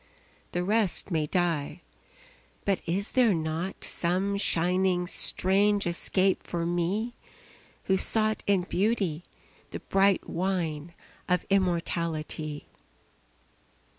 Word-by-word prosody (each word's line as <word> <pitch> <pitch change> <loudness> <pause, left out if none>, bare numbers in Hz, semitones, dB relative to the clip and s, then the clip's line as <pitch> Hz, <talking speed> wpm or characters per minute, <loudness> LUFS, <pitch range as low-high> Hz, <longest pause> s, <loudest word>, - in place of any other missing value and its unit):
The 175 - -1
rest 205 -1 +1
may 155 -3 0
die 170 -4 -1 0.8
but 195 -2 +1
is 190 +4 -1
there 240 -7 +3
not 160 +3 -4
Some 185 +4 0
shining 180 0 +2
strange 200 +3 +3
escape 185 +2 +1
for 170 -1 -4
me 180 +7 -1 0.7
Who 190 - +1
sought 215 +2 +1
in 195 -3 +2
Beauty 190 -4 -1 0.5
the - - -6
bright 195 0 +1
wine 170 -3 -3 0.3
Of 180 0 +1
immortality? 165 -5 -1
180 Hz, 100 wpm, -27 LUFS, 170-195 Hz, 0.8 s, there